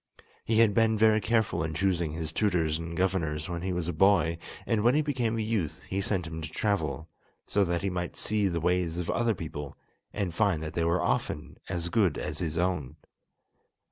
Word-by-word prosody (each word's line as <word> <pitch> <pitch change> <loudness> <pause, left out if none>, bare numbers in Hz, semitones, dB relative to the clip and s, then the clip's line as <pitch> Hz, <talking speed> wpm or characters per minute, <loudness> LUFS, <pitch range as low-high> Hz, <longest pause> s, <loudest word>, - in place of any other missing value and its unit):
He 110 - +1
had 115 -2 +5
been 110 0 +3
very 110 0 +4
careful 110 -6 +1
in 80 -1 -3
choosing 90 -3 +1
his 80 -1 -4
tutors 85 -5 +1
and 85 0 -6
governors 90 -5 0
when 85 -1 -4
he 95 +1 -2
was 90 -2 -2
a 90 - -1
boy, 85 -2 +3 0.3
and 110 -2 +1
when 120 +4 +4
he 155 - +3
became 125 -6 0
a 110 - 0
youth 105 -8 -2
he 95 +1 -2
sent 95 -3 -1
him 80 0 -6
to 80 - -5
travel, 80 -7 -1 0.4
so 100 - +2
that 85 0 -1
he 100 - 0
might 90 -1 -3
see 105 -2 +1
the 85 -2 -1
ways 90 0 0
of 90 -1 -1
other 115 -2 +1
people, 75 -4 -6 0.3
and 100 -5 -2
find 95 -5 +1
that 80 - -5
they 85 - 0
were 85 +2 +2
often 75 -3 -2
as 85 0 -1
good 95 -6 +2
as 75 0 -4
his 80 -2 -2
own. 85 -7 -1
90 Hz, 205 wpm, -29 LUFS, 80-105 Hz, 0.4 s, had